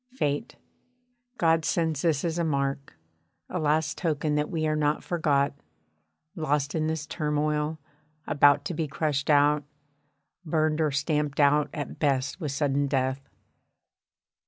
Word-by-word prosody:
Fate 150 - -2 0.8
God 165 -1 +3
sends 160 -3 0
this 160 -2 +1
as 170 0 -1
a - - +1
mark, 140 - -2 0.5
a 180 - -3
last 155 0 0
token 155 -3 0
that 150 0 0
we 160 -2 -1
are 155 0 +1
not 150 0 0
forgot, 145 -5 +1 0.8
lost 145 -3 -1
in 155 -1 0
this 160 -1 -2
turmoil, 150 0 -1 0.5
about 145 0 +4
to 175 - -3
be 160 -1 -2
crushed 145 0 -1
out, 145 0 +4 0.8
burned 155 -1 +1
or 155 - +2
stamped 145 +1 -1
out 145 +1 +4
at 145 -4 -6
best 140 +1 0
with 150 -4 -2
sudden 140 0 0
death. 135 0 -1
150 Hz, 135 wpm, -27 LUFS, 145-155 Hz, 0.8 s, about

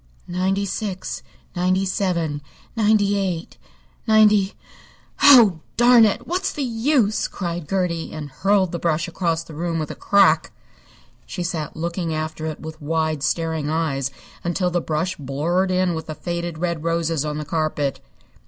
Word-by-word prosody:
"Ninety 190 +3 0
six, 195 -1 -4 0.3
ninety 185 +2 +1
seven, 170 -6 -1 0.3
ninety 210 -2 +3
eight, 180 -3 -3 0.5
ninety 210 -2 +4 0.7
Oh, 235 - +8 0.2
darn 240 -1 +7
it! 210 - 0
What's 370 +3 -1
the 290 - -3
use!" 230 -2 +1
cried 170 -4 -5
Gertie, 180 -4 -1
and 150 -3 -7
hurled 190 +4 +2
the 170 - -3
brush 165 +1 0
across 165 -1 -1
the 165 - -12
room 165 +2 -2
with 155 -2 -3
a - - -7
crack. 200 0 +3 0.8
She 180 - -4
sat 165 -4 -4
looking 170 0 -3
after 155 0 -4
it 155 - -5
with 160 0 -9
wide, 155 0 -1
staring 160 0 -1
eyes 150 -4 -1 0.3
until 180 +1 0
the 175 0 0
brush 165 +4 -2
blurred 155 +7 0
in 185 -1 +1
with 160 0 -5
the 155 - -5
faded 170 -1 -4
red 170 -2 -2
roses 165 -2 0
on 150 -1 -3
the 150 - -4
carpet. 150 -3 -1
170 Hz, 155 wpm, -22 LUFS, 160-195 Hz, 0.8 s, Oh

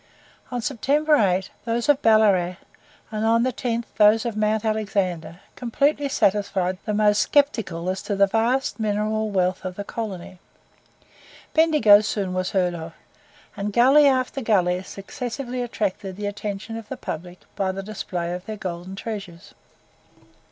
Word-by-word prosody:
On 245 -2 -4
September 295 +4 +2
8, 190 -5 +1
those 235 0 -1
of 290 -1 +4
Ballarat, 200 -5 +4 0.6
and 215 0 -2
on 230 +1 +3
the 255 0 0
10th 235 -1 -2
those 215 +1 +5
of 235 -3 -2
Mount 215 +1 0
Alexander 190 -6 -2
completely 280 +4 0
satisfied 195 -6 +1
the 215 - -1
most 210 0 +3
sceptical 225 - +1
as 190 +1 -2
to 205 - -3
the 200 0 +5
vast 230 +6 0
mineral 215 0 0
wealth 185 -2 0
of 185 -1 -5
the 205 - -5
colony. 190 -4 -6 1.1
Bendigo 300 -11 +6
soon 200 -3 -2
was 185 0 -1
heard 180 -2 +1
of; 165 -1 -7 0.6
and 200 +1 -3
gully 270 +6 +6
after 260 0 +1
gully 185 -6 +2
successively 245 +6 -6
attracted 200 -5 -3
the 205 +1 -5
attention 205 +2 -5
of 225 -2 -10
the - - -5
public 175 +3 -7
by 190 -1 0
the 195 +1 -6
display 180 -4 -4
of 180 0 -6
their 215 -1 -5
golden 180 0 -6
treasures. 195 -5 -7
210 Hz, 150 wpm, -23 LUFS, 185-230 Hz, 1.1 s, Bendigo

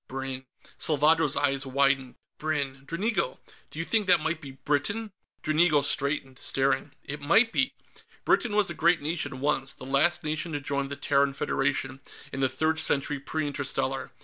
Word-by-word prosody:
"Brinn." 135 0 -5 0.3
Salvadro's 155 -1 +3
eyes 140 -1 +2
widened. 135 -1 +1 0.2
"Brinn, 140 -3 -2
Dranigo! 195 - -1 0.3
Do - - -12
you 165 - -1
think 215 -1 +1
that 180 -2 +6
might 160 +2 -2
be 140 - -8
Britain?" 150 - -1 0.3
Dranigo 155 -1 +3
straightened, 140 -2 -1
staring, 135 0 0
"It 145 +1 -6
might 220 +11 +4
be! 275 +3 +1 0.5
Britain 225 -4 +2
was 210 -2 +2
a - - -3
great 170 -1 +2
nation, 145 -4 -3
once; 140 -2 0
the - - -11
last 140 +7 +2
nation 155 +2 -3
to 145 - -1
join 140 0 -2
the 140 - -5
Terran 140 -1 +1
Federation, 135 -1 -1 0.3
in 135 - -4
the 135 -1 +2
Third 160 +5 0
Century 145 0 +1
Pre 155 +3 -3
Interstellar. 135 -2 -2
145 Hz, 165 wpm, -27 LUFS, 135-160 Hz, 0.5 s, that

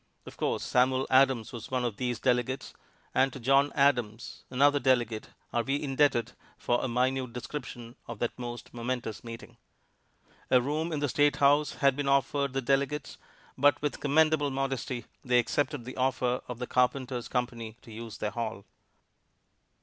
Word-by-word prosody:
Of - - -10
course - - -1
Samuel 130 +1 +2
Adams 130 -4 +4
was 115 -2 -7
one 125 -1 0
of 110 -4 -3
these 125 -3 -2
delegates; 125 +1 0 0.4
and 135 +1 +3
to 135 - -8
John 135 +3 +3
Adams, 120 -6 +1
another 145 +3 +4
delegate, 120 -4 +1 0.2
are 120 - +2
we 135 +4 -1
indebted 135 -5 +1 0.3
for 120 0 0
a - - 0
minute 125 0 0
description 125 -2 -7
of 120 - -6
that 120 +2 -1
most 120 -1 -7
momentous 120 -2 -4
meeting. 115 0 -9 0.9
A 125 - +6
room 150 +6 -2
in 150 -2 -2
the 145 - +1
State 145 +2 +3
House 145 0 +3
had 140 -2 +2
been 145 0 -2
offered 140 0 +1
the 135 0 -1
delegates, 140 +3 0 0.4
but 145 +2 +4
with 150 - -1
commendable 150 0 +3
modesty 135 -3 -3 0.2
they 125 -1 +3
accepted 145 +2 0
the 125 - -7
offer 125 -1 +1
of 125 - -6
the 125 - -4
Carpenters' 125 -1 0
Company 120 -3 -3
to 115 - -13
use 115 0 -8
their 105 - -2
hall. 110 -4 -4
130 Hz, 165 wpm, -29 LUFS, 120-140 Hz, 0.9 s, A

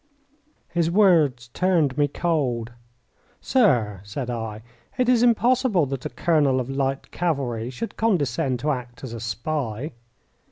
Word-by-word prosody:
His 170 -1 +1
words 160 - +3
turned 165 -3 +1
me 145 0 +2
cold. 135 -8 -1 0.7
"Sir," 120 - +2
said 120 +5 -5
I, 110 -2 -5 0.3
"it 250 -1 +2
is 245 -2 +4
impossible 240 - +3
that 135 -2 -4
a - - -10
colonel 145 -6 +2
of 130 +1 -3
light 135 0 -2
cavalry 130 -9 -2
should 180 - -6
condescend 145 - +1
to 150 - +1
act 125 -2 -6
as 125 -3 -6
a 115 - -5
spy." 120 +3 -3
140 Hz, 135 wpm, -24 LUFS, 120-175 Hz, 0.7 s, is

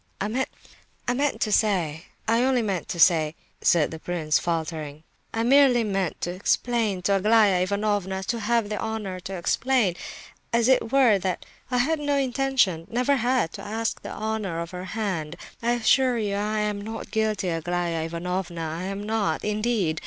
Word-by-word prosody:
"I 200 - -1
meant 260 +2 -3
to 215 - +1
say—I 195 +3 0
only 255 -2 +2
meant 195 -5 -2
to 170 - -4
say," 160 -2 +4 0.3
said 165 -4 +3
the 160 - -7
prince, 160 -3 0
faltering, 160 -3 -3 0.3
"I 225 - -1
merely 255 -1 +5
meant 195 -5 -1
to 175 - -1
explain 205 +1 0
to 200 +1 +3
Aglaya 210 -2 +4
Ivanovna—to 200 +2 -1
have 225 -1 +1
the 210 - -3
honour 215 -4 -4
to 190 +2 -6
explain, 220 +2 +1 0.6
as 235 0 +3
it 255 -3 +3
were—that 205 -9 +3 0.2
I 250 - 0
had 300 +6 +1
no 290 -1 0
intention—never 255 -3 +1
had—to 245 -7 0
ask 225 +2 -3
the - - -7
honour 215 -6 -3
of 170 0 -5
her 180 0 -6
hand. 185 -6 -3 0.3
I 235 +1 +2
assure 245 +1 +3
you 210 -3 -1
I 210 +1 -1
am 210 -1 -1
not 225 +2 -7
guilty, 215 -4 0
Aglaya 170 0 -1
Ivanovna, 170 -1 -3
I - - -4
am 195 +1 -4
not, 210 -7 -1
indeed. 210 -6 0
205 Hz, 155 wpm, -25 LUFS, 175-230 Hz, 0.6 s, merely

